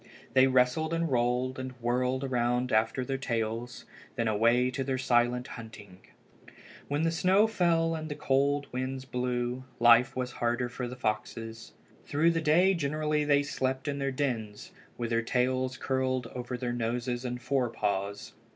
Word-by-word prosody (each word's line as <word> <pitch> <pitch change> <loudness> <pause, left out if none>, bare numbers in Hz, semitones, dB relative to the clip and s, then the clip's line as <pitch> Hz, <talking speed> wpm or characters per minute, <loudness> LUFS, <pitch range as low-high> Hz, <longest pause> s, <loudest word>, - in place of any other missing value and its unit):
They 130 0 +6
wrestled 130 +6 +2
and 165 -2 -1
rolled 125 +1 0
and 130 0 -5
whirled 125 +2 -1
around 125 -1 0
after 110 +4 +1
their 135 0 -2
tails. 115 -1 -3 0.3
Then 115 -1 0
away 115 +4 +3
to 135 +1 -2
their 130 0 -1
silent 125 0 +1
hunting! 105 -5 -10 0.9
When 145 +2 0
the 165 - +2
snow 185 +5 +4
fell 170 -6 +2
and 155 -1 -4
the 145 - -4
cold 140 0 +1
winds 130 +1 -3
blew 125 0 -2 0.2
life 120 +1 +6
was 125 -1 -2
harder 120 +1 -1
for 125 +1 -4
the 125 - -7
foxes. 115 -1 -4 0.3
Through 160 +4 +2
the 165 -1 -1
day 170 +5 +4
generally 150 -1 0
they 145 -1 +3
slept 130 -1 -2
in 140 -1 -2
their 135 0 0
dens, 115 -7 -3 0.3
with 120 -1 -3
their 115 0 +2
tails 130 +2 0
curled 130 -1 -1
over 125 0 -4
their 120 -1 -3
noses 120 +1 -2
and 125 -1 -3
fore 130 -2 0
paws. 100 -2 -3
125 Hz, 160 wpm, -29 LUFS, 120-140 Hz, 0.9 s, They